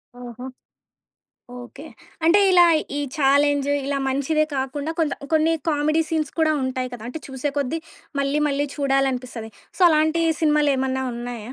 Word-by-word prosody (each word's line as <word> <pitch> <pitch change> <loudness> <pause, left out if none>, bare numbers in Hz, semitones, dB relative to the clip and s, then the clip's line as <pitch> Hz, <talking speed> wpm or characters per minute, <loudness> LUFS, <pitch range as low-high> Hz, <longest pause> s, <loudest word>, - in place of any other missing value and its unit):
ఓహో! 245 0 -9 1.2
ఓకే. 270 +4 -12 0.4
అంటే 335 +5 +5
ఇలా 355 -1 +7 0.3
ఈ - - -1 0.2
చాలెంజ్ 285 0 +3 0.2
ఇలా 280 0 -1
మంచిదే 285 +3 +1
కాకుండా 275 +3 -3
కొంత 300 -3 +1 0.2
కొన్ని 315 +1 +3 0.2
కామెడీ 305 +1 +1
సీన్స్ 310 -3 -1
కూడా 315 -1 +3
ఉంటాయి 255 -1 -2
కదా! 230 - -10
అంటే 320 - -6
చూసే 265 +2 -3
కొద్ది 285 +4 -1 0.4
మళ్ళీ, 280 +1 0
మళ్ళీ 285 0 0
చూడాలనిపిస్తది. 260 -5 -1 0.3
సో, - - -14
అలాంటి 315 +2 +2 0.2
సినిమాలేమన్నా 275 -4 +1
ఉన్నాయా? 240 -1 -6
280 Hz, 135 wpm, -22 LUFS, 260-310 Hz, 1.2 s, ఇలా